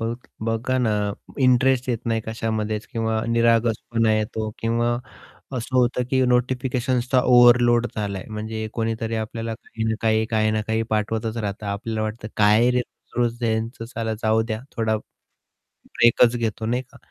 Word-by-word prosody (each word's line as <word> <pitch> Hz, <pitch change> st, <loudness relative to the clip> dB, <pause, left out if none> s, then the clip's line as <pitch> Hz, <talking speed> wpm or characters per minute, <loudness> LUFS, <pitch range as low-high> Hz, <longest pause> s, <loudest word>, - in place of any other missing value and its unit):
बघ 115 Hz, +1 st, -1 dB, 0.3 s
बघा 115 Hz, +3 st, 0 dB
ना, 120 Hz, -3 st, +1 dB, 0.5 s
इंटरेस्ट 130 Hz, 0 st, +3 dB
येत 120 Hz, -3 st, 0 dB
नाही 115 Hz, -1 st, +1 dB
कशामध्येच 110 Hz, -1 st, -2 dB
किंवा 110 Hz, -1 st, -1 dB
निरागसपणा 115 Hz, -1 st, +2 dB
येतो 110 Hz, 0 st, -2 dB
किंवा 120 Hz, +1 st, 0 dB, 0.6 s
असं 125 Hz, +2 st, -3 dB
होतं 125 Hz, 0 st, +2 dB
की 130 Hz, -1 st, +3 dB
नोटिफिकेशन्सचा 125 Hz, 0 st, +1 dB
ओव्हरलोड 120 Hz, -1 st, +6 dB
झालाय 100 Hz, -3 st, -3 dB
म्हणजे 110 Hz, +1 st, -4 dB
कोणीतरी 115 Hz, 0 st, -2 dB
आपल्याला 115 Hz, +1 st, -4 dB
काही 110 Hz, 0 st, -7 dB
ना 110 Hz, 0 st, +1 dB
काही 110 Hz, 0 st, +2 dB
,काही 110 Hz, -1 st, +2 dB
ना 110 Hz, 0 st, 0 dB
काही 110 Hz, 0 st, 0 dB
पाठवतच 110 Hz, +1 st, -1 dB
राहतं 105 Hz, -1 st, -4 dB
आपल्याला 110 Hz, +2 st, -3 dB
वाटतं 110 Hz, 0 st, -4 dB
काय 110 Hz, +4 st, +5 dB
रे 125 Hz, 0 st, +2 dB, 0.4 s
रोज-रोज 120 Hz, 0 st, 0 dB
यांच 115 Hz, +1 st, -1 dB
साला 115 Hz, -2 st, -3 dB
जाऊ 110 Hz, 0 st, +3 dB
द्या 110 Hz, -1 st, -4 dB, 0.2 s
थोडा 110 Hz, -1 st, +1 dB, 0.7 s
ब्रेकच 120 Hz, 0 st, +2 dB
घेतो, 110 Hz, -1 st, -2 dB
नाही 125 Hz, +3 st, 0 dB
का. 130 Hz, -, -20 dB
115 Hz, 145 wpm, -23 LUFS, 110-120 Hz, 0.7 s, ओव्हरलोड